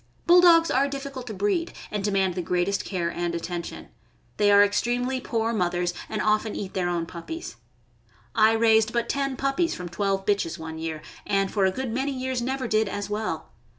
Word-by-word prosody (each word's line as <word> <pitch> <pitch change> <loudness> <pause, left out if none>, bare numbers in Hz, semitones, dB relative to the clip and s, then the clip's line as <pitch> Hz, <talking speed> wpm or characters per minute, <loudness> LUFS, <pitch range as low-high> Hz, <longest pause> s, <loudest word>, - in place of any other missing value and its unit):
Bulldogs 345 -1 +6
are 270 +2 +3
difficult 275 -2 -6
to 220 - -5
breed, 205 - 0 0.2
and 210 -1 -2
demand 195 -2 +1
the 180 - -2
greatest 180 +3 0
care 175 -3 -2
and 170 0 -2
atten 170 +1 -3
tion. - - -9 0.5
They 205 - +4
are 205 0 +7
extremely 245 +5 0
poor 230 -1 -1
mothers, 175 -3 0 0.2
and 215 - -2
often 215 0 +1
eat 195 -2 -5
their 180 -2 0
own 170 -1 -1
puppies. 180 - -7 0.8
I 220 -1 +5
raised 220 -1 +4
but 235 -1 0
ten 275 -2 -1
puppies 275 +5 0
from 180 -1 -6
twelve 195 +2 -1
bitches 200 -5 0
one 160 -1 -7
year, 160 -1 -4 0.2
and 195 -1 +1
for 200 -3 +2
a 190 - +3
good 260 +3 -4
many 265 +4 -1
years 260 -1 -2
never 260 +1 -2
did 215 -2 +2
as 205 +1 -4
well. 215 +1 -3
210 Hz, 190 wpm, -25 LUFS, 185-255 Hz, 0.8 s, are